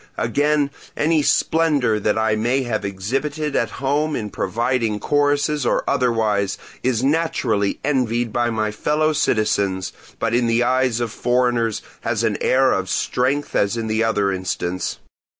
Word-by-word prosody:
Again, 145 +4 +1 0.3
any 155 +1 +2
splendour 145 -8 +2
that 105 +1 0
I 110 -1 +2
may 120 +5 +1
have 110 -4 -2
exhibited 135 +10 -3
at - - +1
home 145 +3 0
in 105 -3 -4
providing 115 +1 -1
choruses 145 +1 +1
or 120 - +1
otherwise, 110 -5 +1 0.2
is 125 -2 0
naturally 135 -9 0
envied 120 -5 0
by 120 0 +1
my 110 -2 -1
fellow 150 +8 0
citizens, 100 -7 0 0.2
but - - -1
in 120 0 +2
the 115 +1 +2
eyes 125 -1 +1
of 120 -2 -2
foreigners 120 -2 0 0.2
has 115 -1 -1
an 110 -3 0
air 130 0 +3
of 95 -1 -1
strength 135 +4 -1
as 100 +3 +1
in 115 - -2
the 110 +1 0
other 105 -3 +1
instance. 90 -1 -3
120 Hz, 150 wpm, -21 LUFS, 110-140 Hz, 0.3 s, air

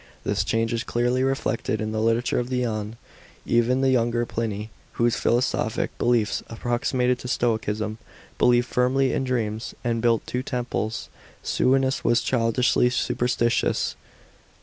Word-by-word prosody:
This - - 0
change 115 0 0
is 115 - -1
clearly 120 +2 0
reflected 130 -5 -1
in 110 0 -2
the 110 0 -1
literature 115 +2 +1
of 120 0 -3
the 125 -1 0
ane. 110 -1 -3 0.5
Even 120 +2 +2
the 135 -1 +3
younger 120 -1 +1
Pliny, 110 -2 -4 0.2
whose 120 -1 +2
philosophic 120 +2 0
beliefs 120 -3 +1
approximated 125 +2 0
to - - -7
Stoicism, 110 -3 -1 0.4
believed 120 0 +4
firmly 130 +2 +1
in - - 0
dreams, 115 -3 -2
and 115 -1 0
built 115 -1 +2
two 125 - -2
temples. 120 -4 -3 0.3
Sue'onius 135 +1 +1
was 120 0 +3
childishly 125 0 +2
superstitious. 120 -1 0
120 Hz, 135 wpm, -24 LUFS, 115-125 Hz, 0.5 s, believed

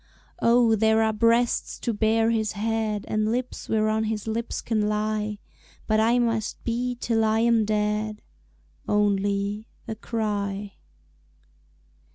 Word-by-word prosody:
Oh, 235 -1 +4
there 220 +1 +3
are 220 0 +1
breasts 230 +2 +2
to 235 - -2
bear 225 +1 +2
his 220 -2 0
head, 215 0 -1
And 215 0 0
lips 250 +1 -4
whereon 220 0 +1
his 215 -1 -3
lips 225 +1 -3
can 215 -2 0
lie, 210 0 -1 0.5
But 215 0 +2
I 230 +3 +3
must 230 -3 -1
be 245 +1 -2
till 225 -2 +1
I 220 0 +2
am 230 -2 +3
dead 210 0 -1 0.6
Only 205 0 0 0.2
a - - -3
cry. 205 -3 -3
220 Hz, 130 wpm, -25 LUFS, 210-225 Hz, 0.6 s, Oh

